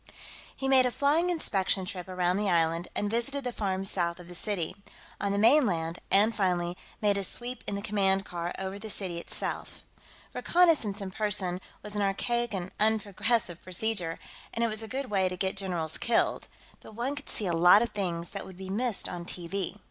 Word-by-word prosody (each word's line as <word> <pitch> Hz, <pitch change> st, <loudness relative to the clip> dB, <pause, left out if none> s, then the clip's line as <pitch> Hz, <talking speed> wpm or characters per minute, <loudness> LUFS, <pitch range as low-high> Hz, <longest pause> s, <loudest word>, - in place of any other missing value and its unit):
He 270 Hz, -, -3 dB
made 260 Hz, -1 st, +6 dB
a -, -, +1 dB
flying 295 Hz, +7 st, +2 dB
inspection 195 Hz, -, +1 dB
trip 185 Hz, -3 st, -5 dB
around 180 Hz, 0 st, +1 dB
the 205 Hz, -1 st, 0 dB
island, 165 Hz, 0 st, +2 dB
and 205 Hz, -, 0 dB
visited 240 Hz, +6 st, -1 dB
the 250 Hz, -, -2 dB
farms 195 Hz, -3 st, 0 dB
south 170 Hz, -1 st, -1 dB
of 175 Hz, -, -11 dB
the 180 Hz, -, -9 dB
city, 180 Hz, -2 st, -2 dB, 0.4 s
on 200 Hz, -, 0 dB
the 200 Hz, -, 0 dB
mainland, 200 Hz, -, +3 dB
and, 215 Hz, +3 st, +4 dB
finally, 180 Hz, -3 st, 0 dB, 0.3 s
made 205 Hz, -2 st, +3 dB
a 200 Hz, -, -1 dB
sweep 245 Hz, +5 st, -2 dB
in 205 Hz, -, -1 dB
the 200 Hz, -, -4 dB
command 195 Hz, -2 st, +2 dB
car 175 Hz, 0 st, -4 dB
over 190 Hz, +1 st, -4 dB
the 220 Hz, +1 st, -7 dB
city 185 Hz, -4 st, -1 dB
itself. -, -, -3 dB, 0.5 s
Reconnaissance 310 Hz, -, +3 dB
in 190 Hz, -1 st, -5 dB
person 195 Hz, -3 st, -1 dB, 0.2 s
was 210 Hz, 0 st, -5 dB
an 205 Hz, -, 0 dB
archaic 235 Hz, +4 st, +1 dB
and 185 Hz, -2 st, -4 dB
unprogressive 215 Hz, -3 st, +1 dB
procedure, 185 Hz, -2 st, -1 dB, 0.4 s
and 230 Hz, -, +1 dB
it 230 Hz, -, +2 dB
was 215 Hz, 0 st, 0 dB
a 220 Hz, -, -5 dB
good 260 Hz, 0 st, -4 dB
way 190 Hz, -2 st, +2 dB
to 180 Hz, -, -5 dB
get 190 Hz, +1 st, -1 dB
generals 175 Hz, -5 st, -3 dB
killed, 235 Hz, -, +1 dB, 0.3 s
but 215 Hz, -, -13 dB
one 250 Hz, +5 st, -2 dB
could 290 Hz, -, -7 dB
see 210 Hz, -, 0 dB
a 175 Hz, -, 0 dB
lot 175 Hz, +6 st, +7 dB
of 235 Hz, -, -2 dB
things 175 Hz, -4 st, -2 dB
that 200 Hz, -, -5 dB
would 190 Hz, -2 st, -11 dB
be 190 Hz, 0 st, -6 dB
missed 235 Hz, +1 st, -1 dB
on 175 Hz, -1 st, -5 dB
TV. 175 Hz, +2 st, -3 dB
200 Hz, 200 wpm, -29 LUFS, 180-225 Hz, 0.5 s, lot